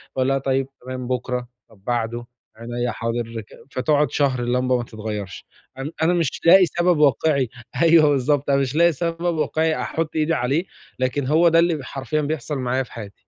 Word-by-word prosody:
باقول 130 0 +1
لها: 135 - +2
"طيب 135 0 0 0.2
تمام 130 -1 -5
بُكرة، 125 0 -2 0.2
طب 100 -4 -22
بعده، 120 0 -2 0.3
عنيّا 120 +2 -3
حاضر." 115 -1 -3
ك 105 - -18 0.2
فتقعُد 145 +3 +1
شهر 135 -3 +1
اللمبة 125 +1 +1
ما 120 - -3
تتغيّرش، 105 -4 -6 0.3
أن 135 +3 -5
أنا 170 +2 +3
مش 165 -6 -1
لاقي 185 +2 +8
سبب 175 0 +1
واقعي، 140 -2 +2 0.3
أيوه 165 -2 +6
بالضبط، 140 +1 +1
أنا 140 0 +3
مش 135 +1 -2
لاقي 170 +1 +5
سبب 170 +2 -2
واقعي 160 0 0
أحط 160 -1 -3
إيدي 155 +1 +1
عليه، 145 +5 0 0.3
لكن 130 +1 -1
هو 165 +4 +4
ده 165 0 +4
اللي 170 0 +3
ب 150 - -6
حرفيًا 135 +4 -3
بيحصل 150 0 -3
معايا 130 +1 0
في 125 - -17
حياتي. 105 -4 -8
135 Hz, 185 wpm, -22 LUFS, 125-155 Hz, 0.3 s, لاقي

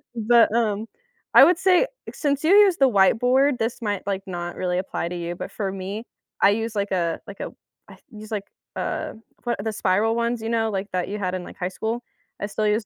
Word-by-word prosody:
But, 230 0 +4
um, 220 -1 0 0.5
I - - +10
would 340 +2 +4
say 380 +5 +4 0.3
since 285 -2 -1
you 320 - +3
use 400 -4 +6
the 270 -2 +5
whiteboard 245 +7 +3
this 230 +2 -2
might 205 -4 -2
like 195 -1 -2
not 175 -1 -5
really 180 -1 -1
apply 185 -2 -3
to 180 - -5
you 175 0 -4
but - - -7
for 195 -3 -3
me, 195 +4 -5 0.4
I 195 - +6
use, 225 +1 -2
like, 200 0 -1
a 170 -3 0
like, 200 - -10
a - - -5 0.4
I - - -13
use, 215 0 -11
like, 205 -2 -3 0.3
uh, - - -3 0.3
what 240 -1 -1
the 220 0 -2
spiral 210 +3 +1
ones, 235 0 -1
you 225 - -3
know, 225 -1 +1
like, 195 0 -3
that 180 -1 -1
you 205 - -3
had 185 -2 -2
in, 185 - -4
like, - - -11
high 180 0 -2
school. 230 +4 -3 0.4
I - - 0
still 215 +1 -1
use 210 +1 +1
215 Hz, 225 wpm, -24 LUFS, 190-235 Hz, 0.5 s, I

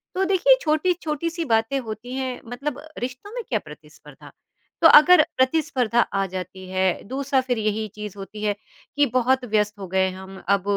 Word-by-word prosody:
तो 380 - +1
देखिए 390 +7 +5
छोटी-छोटी 315 0 0
सी 335 0 -4
बातें 225 +3 +1
होती 235 +1 -7
हैं 260 -1 -4
मतलब 270 +4 -5 0.2
रिश्तों 255 - -6
में 485 -2 -4
क्या - - +1
प्रतिस्पर्धा? - - -15 0.5
तो 325 - +9
अगर 325 +5 +8 0.2
प्रतिस्पर्धा 260 -4 +1
आ 195 0 -1
जाती 185 0 -7
है 185 -1 0
दूसरा 270 +2 0
फ़िर 255 -2 -2
यही 215 0 -1
चीज़ 210 -1 -7
होती 210 +2 -8
है 205 -1 0 0.4
कि 290 0 +4
बहुत 255 +1 +2
व्यस्त 210 -1 0
हो 190 - -6
गए 190 +1 +1
हैं 185 - -5
हम 190 0 -10
अब 200 -2 +3
245 Hz, 180 wpm, -23 LUFS, 210-295 Hz, 0.5 s, तो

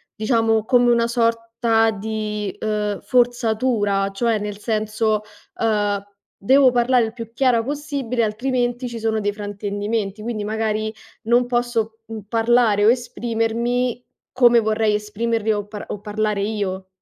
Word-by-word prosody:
diciamo 225 0 +1
come 245 +1 +3
una 235 -1 +3
sorta 230 -1 +1
di, 210 -1 -4
ehm, 210 -2 -2
forzatura, 230 -4 +1
cioè 225 +1 +1
nel 205 0 -5
senso, 215 0 -1 0.4
ehm: 205 -3 +1 0.4
"Devo 265 +2 +6
parlare 245 0 +3
il 220 - -6
più 230 -1 -8
chiara 235 -1 +2
possibile, 280 -3 -3
altrimenti 245 +2 -1
ci 235 -1 -6
sono 220 -1 0
dei 205 0 0
fraintendimenti, 205 0 -3
quindi 220 -1 -3
magari 215 0 -2 0.3
non 240 +2 +3
posso, 240 -2 -1
mhmm, 220 -2 -7
parlare 225 -2 +3
o 215 - +6
esprimermi 240 0 -1 0.3
come 240 -2 +5
vorrei 220 -1 +1
esprimerli 220 +1 -1
o 205 -1 -3
par 210 -1 -8
o 205 - -6
parlare 210 -1 -1
io." 200 -3 -3
225 Hz, 135 wpm, -21 LUFS, 210-240 Hz, 0.4 s, Devo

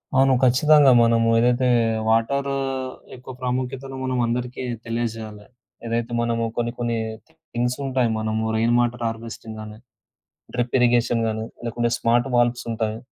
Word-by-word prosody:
అవును. 135 0 +5
ఖచ్చితంగా 145 +2 +6
మనము 115 0 +3
ఏదైతే 125 +2 +2 0.4
వాటరూ 140 +5 +1 0.6
ఎక్కువ 130 +1 -10
ప్రాముఖ్యతను 130 +1 -3
మనం 130 -1 -1
అందరికీ 125 +2 -3 0.2
తెలియజేయాలి. 115 -2 -4 0.4
ఏదైతే 115 0 -2
మనము 115 0 0
కొన్ని 120 0 0
కొన్ని 120 -1 -1 0.5
థింగ్సుంటాయి. 125 +1 0
మనము 110 0 -1
రెయిన్ 115 +2 +2
వాటర్ 120 0 0
హార్వెస్టింగ్ 115 -1 -7
గానీ 105 0 -9 0.8
డ్రిప్ 120 -1 -1
ఇరిగేషన్‌ 120 -1 +3
గాని 110 0 -2 0.2
లేకుంటే 120 0 -1
స్మార్ట్ 120 +3 +1
వాల్వ్స్ 120 0 +2
ఉంటాయి. 110 -1 -2
120 Hz, 125 wpm, -23 LUFS, 115-125 Hz, 0.8 s, ఖచ్చితంగా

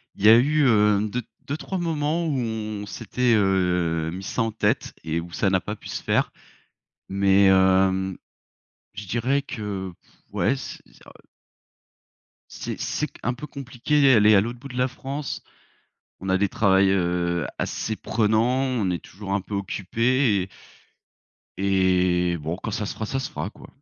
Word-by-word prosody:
Il 100 - -3
y - - +9
a 115 - +9
eu, 150 +4 +3
heu, 105 -3 +4
2- 125 +3 -2 0.3
2-3 155 +7 -3
moments 165 0 -1
où 150 -4 0
on 110 -3 -3
s'était, 120 +5 0
heu, 90 -5 +1
mis 95 +2 -7
ça 115 - -1
en 115 - -1
tête, 110 - 0
et 80 +1 -1
où 85 +1 -8
ça 95 - +1
n'a 95 -1 +2
pas 105 +4 -5
pu - - -13
se - - -5
faire. - - +1 0.8
Mais, 100 0 +4
hem, 95 0 +3 0.8
je 105 0 -7
dirais 130 +6 +1
que, 100 -6 -5
pff, - - -29 0.2
ouais, 130 - +1
c 130 - -7
ça - - -17
heu - - -18 1.3
C'est - - -6
c'est - - -1
q - - -18
un 120 - 0
peu 150 - -7
compliqué 140 +2 -1
elle 110 -5 +5
est 110 - +7
à 95 - +6
l'autre 120 +3 -4
bout 140 - -9
de 125 - -7
la 125 +1 +2
France. 135 +2 -5 0.8
On 95 - -4
a 95 - +3
des 100 +1 +2
travails, 95 -2 +3
heu, 85 -2 0
assez 110 - -2
prenant, 115 +5 +1
on 125 -8 0
est 85 - -2
toujours 100 0 -6
un 100 - +1
peu 100 +2 -6
occupés 110 +3 +1
et 95 - -9 1.1
et, 90 -2 +2
bon 80 +3 -3
quand 110 - -5
ça 110 -1 -2
se - - -4
fera, 110 - -4
ça 135 +4 -2
se 130 - -4
fera 75 +7 -4
quoi. - - -15
105 Hz, 180 wpm, -24 LUFS, 95-125 Hz, 1.3 s, y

